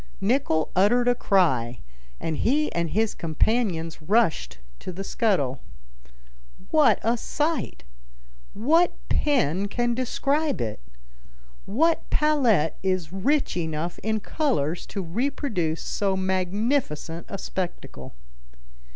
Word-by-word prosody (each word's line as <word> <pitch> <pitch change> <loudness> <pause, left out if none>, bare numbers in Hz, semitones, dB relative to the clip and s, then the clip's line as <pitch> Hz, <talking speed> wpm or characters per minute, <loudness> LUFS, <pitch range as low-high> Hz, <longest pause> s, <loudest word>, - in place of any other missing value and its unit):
Nicholl 200 - +1
uttered 235 +6 +4
a 245 - +5
cry, 135 - +2 0.4
and 160 -2 -3
he 300 +5 +1
and 170 -1 -1
his 220 +4 +1
companions 165 -1 -1
rushed 155 - +1 0.2
to - - -6
the 190 +2 -6
scuttle. 160 - 0 1.1
What 290 -9 +5
a 230 +3 +2
sight! 305 - -2 0.7
What 320 +11 +3 0.2
pen 200 - +1
can 240 +3 0
describe 275 +4 0
it? 110 -3 -3 0.9
What 320 +11 +1
palette 250 - +2
is 185 -3 -1
rich 275 +10 +1
enough 165 0 -3
in 220 0 -1
colors 190 - -1
to 195 - -4
reproduce 190 - -2
so 195 -2 -1
magnificent 185 - -1
a 195 - -4
spectacle? 180 - -6
200 Hz, 110 wpm, -25 LUFS, 165-250 Hz, 1.1 s, a